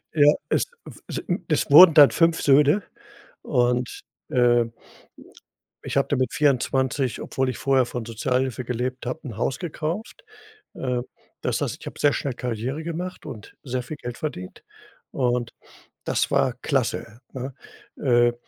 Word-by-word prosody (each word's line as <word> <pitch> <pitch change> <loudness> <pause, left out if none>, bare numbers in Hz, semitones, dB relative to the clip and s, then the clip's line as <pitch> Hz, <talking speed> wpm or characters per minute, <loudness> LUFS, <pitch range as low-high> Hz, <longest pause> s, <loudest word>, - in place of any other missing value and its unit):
Ja, 150 -1 +6
es - - +2 0.2
w - - -12
sin 175 0 -3
es 155 -2 0
wurden 165 +2 +10
dann 145 -2 +9
5 165 -1 +2
Söhne. 145 +7 +4 0.6
Und, 125 0 0 0.3
äh, 120 -1 +4 1.2
ich - - -3
habe 140 - +2
da - - +2
mit 130 -1 0
24, 130 -2 +1
obwohl 130 -1 -1
ich - - -4
vorher 135 -2 +2
von 120 -3 -5
Sozialhilfe 125 +2 -1
gelebt 125 +1 -3
habe, 130 +6 -3
'n 110 -4 -8
Haus 125 +2 -1
gekauft. 175 - -5 0.5
Äh, 125 -2 -2 0.4
das - - -1
heißt, - - -2
ich - - -12
habe - - -8
sehr 145 -1 +4
schnell 140 - -2
Karriere 125 +5 -4
gemacht 175 +2 -5
und 115 -8 -10
sehr 130 -2 -3
viel 150 +5 -7
Geld 120 -1 -6
verdient. 90 -12 -6 0.5
Und 120 -2 0 0.6
das - - 0
war 130 - +2
klasse, 120 -4 -2
ne? 130 +1 -5 0.5
Äh, 120 -2 +3
130 Hz, 150 wpm, -24 LUFS, 120-150 Hz, 1.2 s, wurden